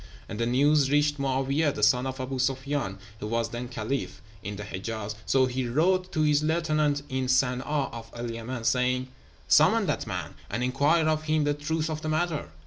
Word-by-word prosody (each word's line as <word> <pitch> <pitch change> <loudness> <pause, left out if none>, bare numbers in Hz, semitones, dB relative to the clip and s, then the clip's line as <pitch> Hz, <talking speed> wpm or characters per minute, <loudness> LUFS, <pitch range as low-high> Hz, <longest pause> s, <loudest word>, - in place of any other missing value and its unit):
And 105 - -6
the 115 - +1
news 140 +3 +3
reached 145 0 +2
Mo'áwiyeh, 135 +2 +1
the - - -3
son 125 -1 +4
of 130 0 -4
Aboo 130 0 -3
Sufyán 135 -5 -1 0.2
(who 105 - -4
was 115 +1 -1
then 120 +1 -5
Caliph), 110 -5 -3 0.2
in 100 +2 -5
the 105 - -6
Hejáz; 105 +2 -5
so 135 -1 +4
he 130 0 -2
wrote 180 +8 +1
to 155 - +1
his 150 -1 +3
lieutenant 155 -2 +1
in 130 0 -2
San'a 125 -1 +2
of 135 -6 -3
El 120 0 -4
Yemen, 115 +1 -5
saying, 125 +2 +1 0.4
'Summon - - +5
that - - -2
man, - - -4 0.2
and 125 - -2
inquire 145 +6 +2
of 155 0 0
him 155 -1 +2
the 145 0 +2
truth 155 +2 -2
of 155 -1 -4
the 155 - -3
matter!' 155 - -1
135 Hz, 195 wpm, -27 LUFS, 120-150 Hz, 0.4 s, Summon